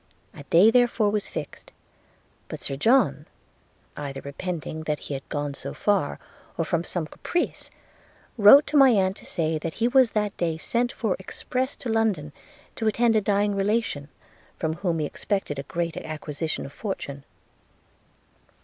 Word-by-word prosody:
A -, -, -10 dB
day 185 Hz, +9 st, +6 dB
therefore 235 Hz, -3 st, +3 dB
was 210 Hz, -1 st, -1 dB
fixed: -, -, -7 dB, 0.8 s
but -, -, -7 dB
Sir 135 Hz, -, -4 dB
John, 155 Hz, -, +3 dB, 0.7 s
either 140 Hz, -2 st, -5 dB
repenting 160 Hz, +2 st, -5 dB
that 150 Hz, -1 st, 0 dB
he 145 Hz, -, -7 dB
had 135 Hz, -1 st, -7 dB
gone 145 Hz, -1 st, -2 dB
so -, -, -7 dB
far, 200 Hz, -8 st, +1 dB, 0.4 s
or 165 Hz, -, 0 dB
from 170 Hz, 0 st, 0 dB
some 175 Hz, -2 st, -3 dB
caprice, 345 Hz, -, -3 dB, 0.7 s
wrote 240 Hz, +7 st, +8 dB
to 300 Hz, -, 0 dB
my 270 Hz, -2 st, +8 dB
aunt 195 Hz, -4 st, +2 dB
to -, -, -13 dB
say 160 Hz, -2 st, -1 dB
he 230 Hz, +8 st, 0 dB
was 260 Hz, -1 st, +5 dB
that 210 Hz, -2 st, 0 dB
day 165 Hz, -2 st, -1 dB
sent 240 Hz, +8 st, 0 dB
for 215 Hz, -6 st, -1 dB
express 255 Hz, +7 st, -3 dB
to -, -, -7 dB
London, 210 Hz, -10 st, 0 dB, 0.4 s
to 225 Hz, -, -1 dB
attend 225 Hz, +1 st, +3 dB
a 215 Hz, -, +4 dB
dying 205 Hz, 0 st, +1 dB
relation, 200 Hz, -7 st, -1 dB, 0.5 s
from 160 Hz, -1 st, -1 dB
whom 175 Hz, -2 st, -1 dB
he 155 Hz, -, -1 dB
expected 170 Hz, -3 st, -3 dB
a 140 Hz, -, -8 dB
great 170 Hz, -1 st, -2 dB
acquisition 155 Hz, 0 st, -4 dB
of 140 Hz, -, -10 dB
fortune. 140 Hz, -9 st, -5 dB
185 Hz, 160 wpm, -25 LUFS, 155-225 Hz, 0.8 s, wrote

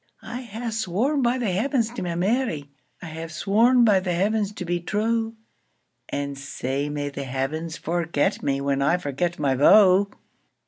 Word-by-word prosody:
I 245 Hz, -, -6 dB
hae 230 Hz, 0 st, -5 dB
sworn 225 Hz, -, 0 dB
by 245 Hz, +1 st, +2 dB
the 235 Hz, -6 st, -1 dB
Heavens 230 Hz, +4 st, 0 dB
to 245 Hz, -, -6 dB
my 175 Hz, -2 st, -3 dB
Mary,I 175 Hz, -, -3 dB
hae 160 Hz, 0 st, -6 dB
sworn 230 Hz, +9 st, +3 dB
by 205 Hz, -4 st, +5 dB
the 185 Hz, -1 st, -2 dB
Heavens 205 Hz, +2 st, +1 dB
to 180 Hz, -, -6 dB
be 175 Hz, 0 st, -1 dB
true; 225 Hz, +5 st, -1 dB, 0.7 s
And 140 Hz, 0 st, -3 dB
sae 135 Hz, +1 st, -3 dB
may 145 Hz, -1 st, -3 dB
the 140 Hz, 0 st, -6 dB
Heavens 150 Hz, +6 st, -3 dB
forget 165 Hz, -3 st, -1 dB
me, 135 Hz, 0 st, -1 dB
When 140 Hz, 0 st, 0 dB
I 160 Hz, +6 st, +3 dB
forget 170 Hz, +2 st, -2 dB
my 140 Hz, -3 st, +1 dB
vow! 190 Hz, +7 st, +6 dB
180 Hz, 165 wpm, -24 LUFS, 145-220 Hz, 0.7 s, vow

